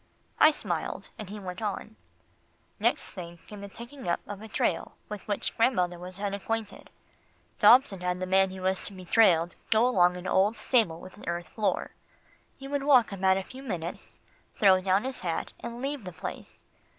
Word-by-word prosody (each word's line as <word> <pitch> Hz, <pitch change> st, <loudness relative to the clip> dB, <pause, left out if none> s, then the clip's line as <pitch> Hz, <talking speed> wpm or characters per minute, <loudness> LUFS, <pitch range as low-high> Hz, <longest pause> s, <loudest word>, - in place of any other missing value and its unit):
I 310 Hz, -, +9 dB
smiled, 305 Hz, -, -3 dB
and 210 Hz, -4 st, -6 dB
he 210 Hz, +1 st, -7 dB
went 180 Hz, -1 st, -7 dB
on. 215 Hz, +1 st, -4 dB, 0.8 s
"Next -, -, +1 dB
thing 170 Hz, -2 st, -8 dB
came 210 Hz, -1 st, -10 dB
the 200 Hz, -, -7 dB
taking 240 Hz, +5 st, -10 dB
up 170 Hz, -, +1 dB
of 205 Hz, 0 st, -7 dB
a 220 Hz, -, -8 dB
trail 220 Hz, -, -1 dB, 0.2 s
with 210 Hz, -2 st, -7 dB
which 205 Hz, -1 st, -1 dB
grandmother 180 Hz, -8 st, +2 dB
was 180 Hz, +2 st, -8 dB
unacquainted. 205 Hz, +2 st, -3 dB, 0.7 s
Dobson 240 Hz, -7 st, +6 dB
had 180 Hz, 0 st, -1 dB
the 185 Hz, -, -2 dB
man 190 Hz, +1 st, +3 dB
who 185 Hz, 0 st, -8 dB
was 190 Hz, 0 st, 0 dB
to 205 Hz, -, -3 dB
be 185 Hz, -1 st, -10 dB
trailed 175 Hz, -4 st, +4 dB
go 230 Hz, +3 st, +4 dB
to 180 Hz, -4 st, +4 dB
an 180 Hz, -, -10 dB
old 200 Hz, +4 st, +2 dB
stable 215 Hz, -11 st, +2 dB
with 185 Hz, +2 st, -12 dB
an -, -, -11 dB
earth 175 Hz, 0 st, -3 dB
floor. 215 Hz, -2 st, -1 dB, 0.7 s
He 270 Hz, -, -9 dB
would 285 Hz, 0 st, -1 dB
walk 265 Hz, -6 st, +5 dB
about 190 Hz, -1 st, +2 dB
a 195 Hz, -, -2 dB
few 260 Hz, +6 st, -11 dB
minutes, 180 Hz, -9 st, -5 dB, 0.4 s
throw 190 Hz, -2 st, +5 dB
down 190 Hz, +2 st, +2 dB
his 265 Hz, 0 st, -4 dB
hat, 170 Hz, -3 st, -3 dB
and 235 Hz, +2 st, -7 dB
leave 275 Hz, -3 st, -3 dB
the 180 Hz, -2 st, -7 dB
place. -, -, -7 dB
200 Hz, 185 wpm, -28 LUFS, 180-225 Hz, 0.8 s, I